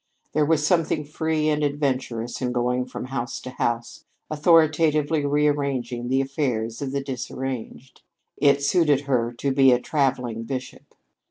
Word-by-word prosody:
There 150 0 +2
was 155 -2 +2
something 160 -3 +1
free 155 +1 -1
and 150 -1 +1
adventurous 130 -5 -2
in 125 -1 -1
going 125 +1 0
from 125 - -6
house 120 -2 -3
to 130 - -7
house, 120 -2 -3 0.3
authoritatively 155 -1 +3
rearranging 140 -4 0
the 135 +2 +2
affairs 125 -5 -2
of 135 -2 -3
the 140 0 -2
disarranged. 130 -1 -6 0.4
It 140 0 +3
suited 145 -2 +3
her 125 -4 0
to 135 +3 -2
be 135 -1 +5
"a 125 - +4
traveling 125 -5 -1
bishop." 125 +2 -7
135 Hz, 145 wpm, -24 LUFS, 125-150 Hz, 0.4 s, be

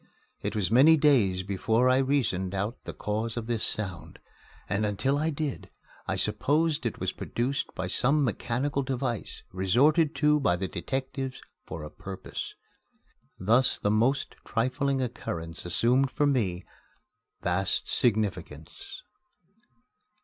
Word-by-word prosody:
It - - -3
was 105 -2 0
many 145 +7 +7
days 115 -12 +3
before 110 +5 +1
I 130 0 +5
reasoned 110 -9 0
out 100 +5 -3
the - - -4
cause 110 +2 -3
of 115 - -3
this 115 -2 -1
sound; 95 -5 -3 0.5
and 100 +2 0
until 130 +7 +1
I 155 +2 +1
did 150 -3 -4 0.4
I - - 0
supposed 150 -2 +1
it 115 - -5
was - - -1
produced 130 +4 -3
by 95 - -2
some 135 +10 +2
mechanical 130 +4 -1
device 125 -4 -3
resorted 140 - +3
to 150 +1 +3
by 90 -11 +2
the 95 +2 -2
detectives 135 +3 -4 0.2
for 80 -1 -6
a 75 - -8
purpose. 95 +3 -7 0.8
Thus 115 +7 +3
the 105 - 0
most 120 +6 +1
trifling 130 +3 0
occurrence 85 -9 -5
assumed 125 +9 +3
for 145 +3 +1
me 105 -11 0 0.8
vast 90 0 0
significance. 110 -4 -1
120 Hz, 130 wpm, -28 LUFS, 100-140 Hz, 0.8 s, many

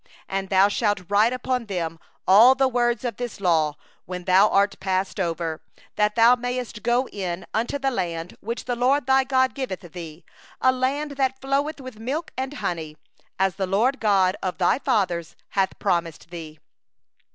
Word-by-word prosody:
3And 195 0 -3
thou 195 0 +5
shalt 205 -2 0
write 210 +3 +4
upon 250 -1 -2
them 165 -4 -3 0.3
all 225 +7 +8
the 270 0 +3
words 240 0 0
of 240 - -3
this 245 -4 -5
law, 160 -5 +2 0.3
when 180 0 -6
thou 190 +3 +5
art 200 +1 +2
passed 190 +1 -1
over; 165 -2 -2 0.3
that 210 0 +1
thou 230 +1 +7
mayest 245 -2 -4
go 245 +3 +1
in 185 -3 -4
unto 235 +5 -1
the 270 -1 0
land 170 -6 -3
which 230 +3 -5
the 245 - -1
LORD 255 +3 +2
thy 265 0 +4
God 260 -1 +2
giveth 255 -9 -4
thee, 170 -2 -10 0.3
a 260 - +4
land 275 +2 -2 0.2
flowing 275 +3 0
with 255 -4 -9
milk 280 +8 -3
and 265 +2 -4
honey, 160 - -4 0.4
as 190 -1 +1
the 190 -2 -1
LORD, 215 +8 +2
the - - -30
God 195 -4 +3
of 185 -1 -3
thy 185 +7 +2
fathers, 185 - 0
hath 195 -1 0
promised 170 -1 -2
thee. 160 -3 -8
210 Hz, 175 wpm, -24 LUFS, 180-255 Hz, 0.4 s, all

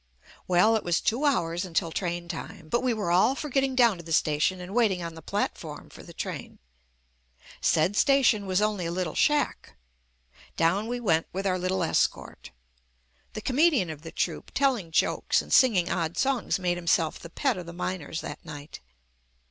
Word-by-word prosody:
Well, 185 +5 +4
it 220 - -1
was 175 -1 +1
two 250 +7 0
hours 175 - +1
until 165 -2 -1
train 175 -1 -3
time, 165 -2 -8
but 240 - +1
we 255 -1 +1
were 210 -6 -1
all 190 +9 +4
for 300 - -5
getting 270 0 +1
down 235 -6 +4
to 170 - -10
the 165 - -10
station 155 +4 +1
and 180 +2 -8
waiting 210 -7 +2
on 170 -1 -5
the 160 - -11
platform - - -4
for - - -12
the - - -12
train. - - -6 1.0
Said 165 +6 +2
station 250 -6 +3
was 190 +2 +1
only 205 -5 -1
a - - -3
little 175 -2 -2
shack. 295 -1 0 0.8
Down 185 +7 +2
we 245 +1 -3
went 165 -9 +1
with 195 +2 -4
our 185 -1 +1
little 185 0 -1
escort. 160 - -1 0.8
The 215 - -5
comedian 265 - +2
of 150 -2 -9
the 165 0 -9
troupe - - -3
telling 255 -11 +1
jokes 160 - +1
and - - -4
singing 195 -9 +4
odd 170 -1 -2
songs 265 -4 +1
JUST - - -2
ME 180 - 0
made 175 - 0
himself 165 -2 +1
the 170 - -10
pet 265 - 0
of 180 -2 -7
the - - -6
miners 175 -3 -4
that - - -8
night. 145 0 -9
185 Hz, 190 wpm, -27 LUFS, 170-235 Hz, 1.0 s, Well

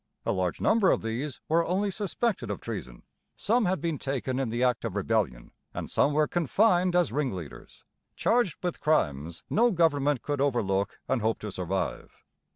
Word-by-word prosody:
A - - +1
large 90 -2 -1
number 220 -3 +4
of - - +2
these 120 +5 -3
were 165 +2 +3
only 195 +4 0
suspected 205 - -1
of 100 - -3
treason; 60 -1 -7 0.3
some 230 +2 +2
had 185 +1 +1
been 165 -4 -2
taken 135 -1 -2
in 135 -4 -1
the 120 +2 -1
act 125 -2 +1
of 95 - -3
rebellion; 100 - -1 0.2
and - - -5
some 145 - +3
were 150 +1 +2
confined 180 - +2
as 180 -1 +3
ringleaders, 95 - -5 0.3
charged 235 -9 +2
with 175 -2 -2
crimes 80 - 0
no 235 +3 +3
government 145 - +2
could 145 -2 -1
overlook 100 -8 0
and 125 - 0
hope 110 +1 +1
to 105 - -5
survive. 95 +1 -4
140 Hz, 170 wpm, -28 LUFS, -, 0.3 s, number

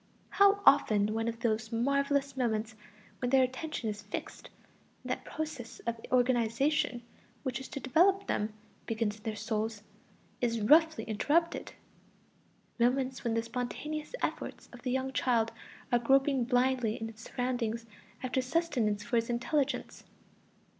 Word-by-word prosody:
How 400 0 +5
often 210 0 +5
one 225 +1 -1
of 230 0 -3
those 225 -1 0
marvelous 280 +3 +1
moments 220 -3 -1 0.4
when 245 - -1
their 265 0 +5
attention 260 0 -3
is 210 -1 -3
fixed, - - -7 0.5
and - - -4
that - - -3
process 305 -7 -5
of 235 -1 -3
organization 250 +2 +2 0.4
which 260 -2 -2
is 265 - -8
to - - -6
develop 370 +10 +3
them 210 +1 -1 0.4
begins 220 -2 -1
in - - -19
their 215 0 -3
souls, 215 0 -2 0.6
is 230 -2 +1
roughly 315 +8 +5
interrupted; 300 +10 0 1.1
moments 255 +2 +1
when 230 -2 0
the 230 - +1
spontaneous 295 - -4
efforts - - -3
of 245 - -11
the 250 - -3
young 265 +1 -1
child 230 -4 +2 0.4
are 240 - +4
groping 270 +1 +3
blindly 250 -2 +1
in 225 - -3
its 225 0 -11
surroundings 235 -2 -2 0.4
after 255 +1 0
sustenance 255 -8 0
for 235 - 0
its 230 +1 0
intelligence. 275 +4 -1
245 Hz, 140 wpm, -31 LUFS, 225-275 Hz, 1.1 s, How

